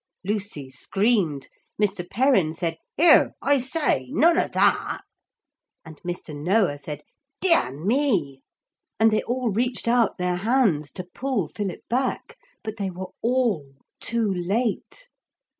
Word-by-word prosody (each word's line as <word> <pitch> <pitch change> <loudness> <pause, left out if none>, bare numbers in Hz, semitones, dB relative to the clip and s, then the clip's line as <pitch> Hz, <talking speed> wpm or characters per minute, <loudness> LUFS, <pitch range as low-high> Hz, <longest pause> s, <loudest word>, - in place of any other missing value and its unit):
Lucy 205 -8 -3
screamed, 185 - 0 0.3
Mr. 200 -4 0
Perrin 200 - +2
said, 165 -1 -3 0.2
'Here, 325 0 +6
I 285 0 +3
say, 255 - 0
none 335 +2 +4
of - - 0
that,' - - +2 0.8
and 160 -2 -13
Mr. 175 -3 -6
Noah 175 0 +1
said, 150 +1 -7 0.4
'Dear 335 - +5
me!' 180 - 0 0.6
And 220 0 +5
they 215 - +2
all 245 -1 -2
reached 240 +4 -1
out 235 -2 +2
their 180 0 -1
hands 200 - +1
to 185 - -5
pull 210 - -3
Philip 195 -2 -5
back. 265 - -2 0.3
But 215 0 -6
they 200 -2 -2
were 185 +1 -7
all 225 - 0 0.2
too 230 -4 0
late. 215 - -2
205 Hz, 130 wpm, -24 LUFS, 170-245 Hz, 0.8 s, Here